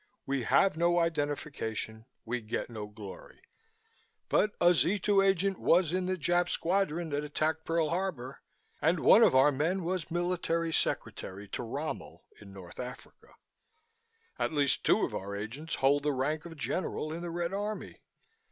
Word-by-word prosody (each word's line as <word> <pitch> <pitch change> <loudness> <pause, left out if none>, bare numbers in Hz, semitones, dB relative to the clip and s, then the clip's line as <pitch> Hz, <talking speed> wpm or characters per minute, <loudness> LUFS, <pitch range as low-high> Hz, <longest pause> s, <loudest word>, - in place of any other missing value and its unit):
We 135 -3 -1
have 195 - +4
no 170 +1 +2
identification, 145 -8 -2 0.2
we 120 +1 -2
get 110 +2 -4
no 105 -2 -6
glory, 105 -2 -11 0.9
but 210 0 +2
a 175 +1 +6
Z 180 +4 +2
2 200 0 +3
agent 195 0 +2
was 170 -1 +3
in 185 0 0
the 185 0 0
Jap 175 +2 +2
squadron 170 -2 0
that 145 +1 -1
attacked 155 +2 -1
Pearl 165 -2 +1
Harbor 165 -8 -3 0.4
and - - +2
one - - +7
of - - +6
our 135 +3 +6
men 165 +7 0
was 180 -1 -2
military 170 -1 -1
secretary 100 -8 -2
to - - -4
Rommel 140 +6 -5 0.2
in 100 -1 -12
North 95 -3 -12
Africa. 125 0 -9 1.0
At - - 0
least 145 -2 +2
two - - +4
of - - -7
our 100 +1 -4
agents 120 +11 -5
hold 140 +2 +3
the 145 0 0
rank 150 +4 -1
of 165 -2 -9
General 155 -1 -2
in 170 - -5
the 175 - -4
Red 170 +1 -2
Army. 210 +2 -4
160 Hz, 160 wpm, -30 LUFS, 130-175 Hz, 1.0 s, one